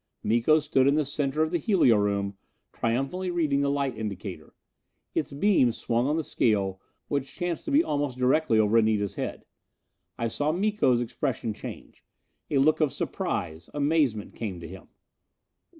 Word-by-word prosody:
Miko 120 +8 +3
stood 140 -3 +2
in 140 - +4
the 155 -1 +1
center 145 +1 0
of 160 - -2
the 175 - +1
helio 170 - +4
room, 100 -1 0 0.4
triumphantly 135 +11 -1
reading 155 -5 +1
the 140 - +1
light 140 -3 -1
indicator. 100 -6 -6 0.6
Its - - -1
beam 140 - +3
swung 120 +2 -1
on 150 +2 +1
the 160 - -1
scale, 100 -8 0 0.3
which 140 -2 -3
chanced 175 -2 -3
to - - -3
be 295 +4 +5
almost 145 - -2
directly 130 -1 +2
over 110 +1 +4
Anita's 110 -2 +1
head. - - -5 0.7
I 115 - -1
saw 145 +6 0
Miko's 185 - +2
expression 115 -1 -2
change. - - -10 0.5
A 145 - +1
look 150 +4 +3
of 150 -3 +3
surprise, 80 -1 -3
amazement 145 -8 +1
came 100 -6 -5
to 85 - -8
him. - - -11
135 Hz, 160 wpm, -27 LUFS, 110-155 Hz, 0.7 s, be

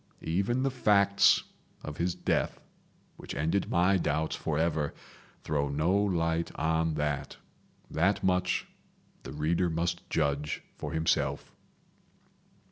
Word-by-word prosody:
Even 100 +10 0
the 135 - +1
facts 100 -5 +4 0.4
of 75 - -6
his 85 +1 0
death, - - -1 0.6
which - - -7
ended 80 +8 0
my 90 +3 +3
doubts 80 -2 -1
forever, 80 -1 -1 0.5
throw 70 -2 0
no 75 +6 +1
light 85 -5 +1
on 80 0 0
that. 75 -2 -2 0.5
That 95 +6 +1
much 90 -1 +1 0.6
the - - -8
reader 80 +4 0
must 85 +1 -2
judge 75 -1 -1
for - - -5
himself. 80 0 0
80 Hz, 115 wpm, -29 LUFS, 75-90 Hz, 0.6 s, facts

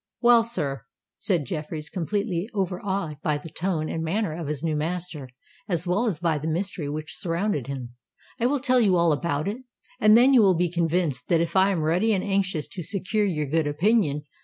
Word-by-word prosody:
"Well, 240 -1 +6
sir," 145 - -3 0.3
said 175 -8 0
Jeffreys, 150 +1 -5
completely 190 +2 -2
over 185 -2 -1
awed 190 -7 -3
by 150 -1 0
the 150 +2 -10
tone 165 -2 -2
and 160 - -3
manner 175 +1 -1
of 165 -2 -5
his 150 0 -3
new 160 -2 0
master, 160 -3 -3 0.4
as 175 -1 0
well 195 +7 +1
as 195 -8 -1
by 165 -2 0
the 155 - -4
mystery 170 -2 -2
which 155 +1 -5
surrounded 170 - -1
him; 130 -3 -6 0.5
"I 240 - +2
will 285 +2 +1
tell 255 -1 +3
you 200 -6 +4
all 170 -1 +3
about 150 0 -1
it—and 225 -1 +1
then 255 +3 +6
you 250 - +7
will 190 -4 +4
be 175 -1 +1
convinced 165 -5 0
that 170 0 +1
I 190 +1 +5
am 175 -5 0
ready 180 +8 +2
and 185 - -1
anxious 195 -6 0
to 185 - -6
secure 205 +4 -1
your 155 -6 -1
good 155 +2 0
opinion. 155 -1 +1
175 Hz, 200 wpm, -25 LUFS, 155-200 Hz, 0.5 s, you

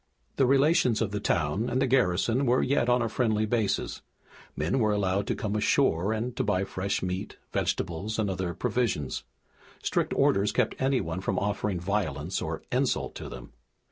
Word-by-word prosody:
The 135 - +4
relations 135 -3 +4
of 110 -3 -1
the 105 - -2
town 85 +5 0
and 130 - 0
the - - +3
garrison 125 +1 +2
were 125 +2 +3
yet 125 -2 +1
on 125 0 +3
a - - 0
friendly 110 -2 +1
basis. 110 -2 -1 0.5
Men 85 - 0
were 110 -2 +3
allowed 100 -1 0
to - - 0
come 105 -1 -3
ashore 105 - +2
and 115 +3 -2
to - - +1
buy 95 -2 +1
fresh 100 0 -2
meat, 90 +1 -4 0.2
vegetables, 95 +6 -1
and 110 -2 +1
other 95 -2 -2
provisions. 115 - -1 0.6
Strict - - 0
orders 100 +2 +3
kept 125 -3 +1
anyone 125 -11 0
from 95 0 -1
offering 100 -2 -1
violence 90 -4 -2
or - - -4
insult - - 0
to - - -7
them. - - -10
105 Hz, 175 wpm, -28 LUFS, 95-120 Hz, 0.6 s, The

